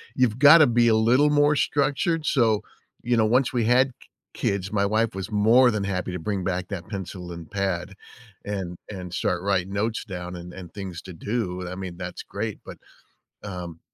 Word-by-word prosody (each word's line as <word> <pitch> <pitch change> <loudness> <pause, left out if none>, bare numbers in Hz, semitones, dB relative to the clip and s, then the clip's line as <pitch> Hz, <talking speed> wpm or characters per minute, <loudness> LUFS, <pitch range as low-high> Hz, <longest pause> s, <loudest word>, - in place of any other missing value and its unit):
You've 125 -3 +2
gotta 150 +3 +8
be 120 0 +3
a 110 - +4
little 125 +7 +4
more 145 0 +4
structured, 145 +3 0
so, 115 -8 +2 0.4
you 120 0 +1
know, 110 - +4
once 125 +4 +2
we 120 -3 +1
had 125 +3 +4
k - - -19 0.3
kids, 100 0 -1
my 100 -1 +1
wife 110 +2 +1
was 95 +3 -5
more 115 +5 +5
than 105 -2 -2
happy 95 -2 -2
to 90 - -3
bring 95 +2 -2
back 90 -1 -2
that 90 -3 -6
pencil 95 -3 -6
and 85 -1 -9
pad 95 -2 -2 0.5
and 95 -4 -4
and 90 -3 -7
start 90 +1 -1
writing 95 -1 0
notes 110 +3 -1
down 90 -3 -6
and 90 0 -8
and 90 -3 -10
things 95 -5 -6
to 95 - -9
do. 90 -1 -3
I 90 - -6
mean, 90 -2 -7
that's 90 -1 -6
great, 105 +1 -5
but - - -9 0.7
um 90 -5 -7
100 Hz, 195 wpm, -25 LUFS, 90-115 Hz, 0.7 s, gotta